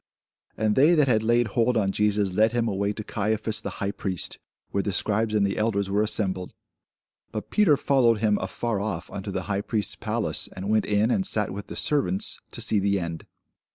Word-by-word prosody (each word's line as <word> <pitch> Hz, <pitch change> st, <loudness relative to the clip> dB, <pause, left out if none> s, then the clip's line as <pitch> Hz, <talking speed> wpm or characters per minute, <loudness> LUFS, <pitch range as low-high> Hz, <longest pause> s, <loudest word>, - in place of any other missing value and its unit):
And 110 Hz, -1 st, +1 dB
they 155 Hz, +6 st, +5 dB
that 150 Hz, -3 st, +4 dB
had 110 Hz, -4 st, +3 dB
laid 120 Hz, +1 st, +2 dB
hold 115 Hz, +3 st, +1 dB
on 100 Hz, -3 st, +1 dB
Jesus 105 Hz, -2 st, +1 dB
led 110 Hz, +4 st, +3 dB
him 120 Hz, -1 st, +1 dB
away 100 Hz, -1 st, 0 dB
to 110 Hz, +1 st, -6 dB
Caiaphas 110 Hz, +1 st, -2 dB
the -, -, -4 dB
high 100 Hz, 0 st, -1 dB
priest, 95 Hz, -4 st, -2 dB, 0.3 s
where 100 Hz, -, +1 dB
the 100 Hz, -, -2 dB
scribes 110 Hz, +3 st, +1 dB
and 105 Hz, -1 st, +3 dB
the 100 Hz, -, -1 dB
elders 100 Hz, -3 st, 0 dB
were 100 Hz, +1 st, +2 dB
assembled. 95 Hz, -4 st, -1 dB, 0.8 s
But 105 Hz, -, -6 dB
Peter 190 Hz, -9 st, +4 dB
followed 125 Hz, -6 st, +3 dB
him 105 Hz, -1 st, +1 dB
afar 105 Hz, +3 st, -2 dB
off 100 Hz, -4 st, -4 dB
unto 100 Hz, +1 st, -6 dB
the 95 Hz, -1 st, -3 dB
high 100 Hz, 0 st, -2 dB
priest's 105 Hz, -3 st, -2 dB
palace, -, -, -1 dB
and 95 Hz, +3 st, -3 dB
went 110 Hz, -1 st, +2 dB
in, 105 Hz, +3 st, +2 dB
and 190 Hz, -, +1 dB
sat 105 Hz, -, +1 dB
with 100 Hz, +1 st, -7 dB
the -, -, -7 dB
servants, 170 Hz, +8 st, 0 dB
to 115 Hz, -, -3 dB
see 110 Hz, -2 st, +4 dB
the 100 Hz, 0 st, +1 dB
end. 85 Hz, -2 st, -6 dB
105 Hz, 205 wpm, -25 LUFS, 100-115 Hz, 0.8 s, they